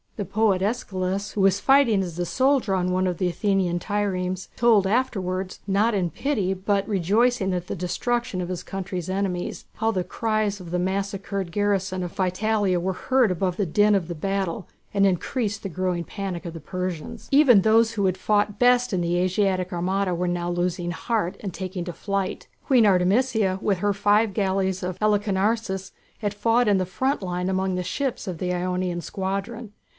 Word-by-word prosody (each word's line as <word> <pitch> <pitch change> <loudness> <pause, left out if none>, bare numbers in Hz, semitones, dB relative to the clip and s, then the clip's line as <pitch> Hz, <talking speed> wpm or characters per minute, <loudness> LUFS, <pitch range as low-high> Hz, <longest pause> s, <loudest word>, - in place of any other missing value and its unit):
The 205 - -3
poet 200 -1 +1
Æschylus, 195 -3 -2
who 205 - -1
was 195 0 +4
fighting 235 -4 +4
as 175 -2 -6
a 175 - -1
soldier 260 -2 +2
on 180 -1 0
one 185 +1 +1
of 180 -2 -2
the 180 - 0
Athenian 180 -1 0
triremes, 185 -2 -2
told 225 -4 +4
afterwards, 190 -5 -1
not 205 +4 +2
in 180 -3 0
pity, 205 - -1
but 195 +1 -1
rejoicing 205 +1 +2
at 180 0 -3
the - - -3
destruction 235 +5 -2
of 175 - -4
his 180 -1 -3
country's 185 -2 -5
enemies, 190 -2 -2
how 220 0 0
the 190 -5 0
cries 215 -1 -1
of 180 -2 -9
the 180 +1 -1
massacred 195 0 -2
garrison 195 -1 0
of 175 - -6
Psytalia 195 0 +1
were 190 +2 -1
heard 255 +2 +2
above 180 0 -1
the 200 - +1
din 205 +5 +3
of 185 -4 0
the 170 - -5
battle 195 +2 -2 0.3
and 200 -1 +3
increased 205 +3 -1
the 195 - -3
growing 180 -1 -1
panic 190 -1 -5
of 170 - -5
the 165 - -7
Persians. 180 0 -5
Even 270 -7 +6
those 225 +2 +4
who 205 -3 -1
had 185 -1 +1
fought 205 +1 +1
best 245 -1 +4
in 180 - +1
the 175 0 0
Asiatic 185 0 0
armada 185 +2 0
were 180 +1 -1
now 175 0 -1
losing 175 0 -1
heart 195 +1 -2
and 195 -4 -5
taking 185 -1 -4
to 175 - -5
flight. 195 0 -3 0.2
Queen 250 -5 +5
Artemisia, 195 +1 +2
with 195 -4 +1
her 205 +2 +1
five 205 +1 +2
galleys 190 -2 0
of 180 -1 -3
Halicarnassus, 205 -1 0 0.3
had 205 -2 -2
fought 230 +3 +2
in 205 -2 +4
the 185 - 0
front 260 +10 -1
line 180 0 -2
among 190 0 0
the 180 - -2
ships 260 +3 -3
of 180 -3 -4
the 180 -1 -1
Ionian 180 -1 -1
squadron. 200 +5 -4
195 Hz, 185 wpm, -24 LUFS, 180-210 Hz, 0.3 s, Even